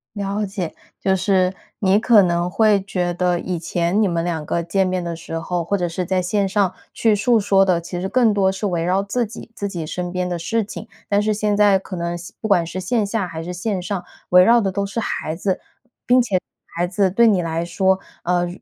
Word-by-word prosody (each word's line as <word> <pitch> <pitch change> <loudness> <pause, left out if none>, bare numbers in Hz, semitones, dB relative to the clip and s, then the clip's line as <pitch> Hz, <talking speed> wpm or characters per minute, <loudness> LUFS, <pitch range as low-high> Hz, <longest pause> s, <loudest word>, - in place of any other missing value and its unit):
了 205 +1 -2
解， 190 -4 -4 0.3
就 190 - +2
是 190 -1 +2 0.3
你 195 +1 +3
可 225 -3 +6
能 175 -1 +1
会 210 -1 +3
觉 180 -2 -2
得 175 0 +1
以 180 -2 -3
前 175 +4 0
你 210 - +3
们 170 -1 -1
2 160 -3 -2
个 170 - -1
见 190 +3 +1
面 185 -1 -1
的 170 -1 -3
时 165 0 -6
候， 175 +1 -2
或 200 +5 0
者 175 -2 -1
是 180 +2 -3
在 185 +1 +1
线 195 +2 0
上 195 -2 +1 0.2
去 225 -2 +2
述 230 +3 +3
说 195 -1 +4
的， 180 -3 +2
其 175 +1 -5
实 190 - -2
更 240 -4 +3
多 195 -2 +3
是 195 +2 -4
围 175 -3 -1
绕 185 +3 +1
自 235 +5 -1
己 225 +1 -10
自 200 - -4
己 170 -5 -5
身 175 +2 -4
边 180 0 -1
的 175 -1 -3
事 225 +7 0
情， 215 +2 -8 0.2
但 205 0 +3
是 215 0 +1
现 210 0 0
在 205 -2 +5
可 190 0 -7
能 170 0 -2
线 175 +1 -10
不 220 - -2
管 180 -5 +3
是 170 +3 -5
线 210 +4 0
下 200 -2 -2
还 165 -1 -6
是 175 - -5
线 185 +1 -2
上， 190 -1 -3 0.3
围 180 0 +7
绕 235 0 +5
的 195 -2 0
都 200 +1 -1
是 200 +4 -3
孩 155 -6 -3
子， 190 +3 -1 0.3
并 250 - -39 0.5
且 - - -66 0.3
孩 175 +1 0
子 195 -1 +1
对 235 +4 +5
你 200 -5 +3
来 165 0 -2
说， 190 +2 +1 0.2
呃， 175 0 +1
190 Hz, 250 characters per minute, -21 LUFS, 175-205 Hz, 0.5 s, 围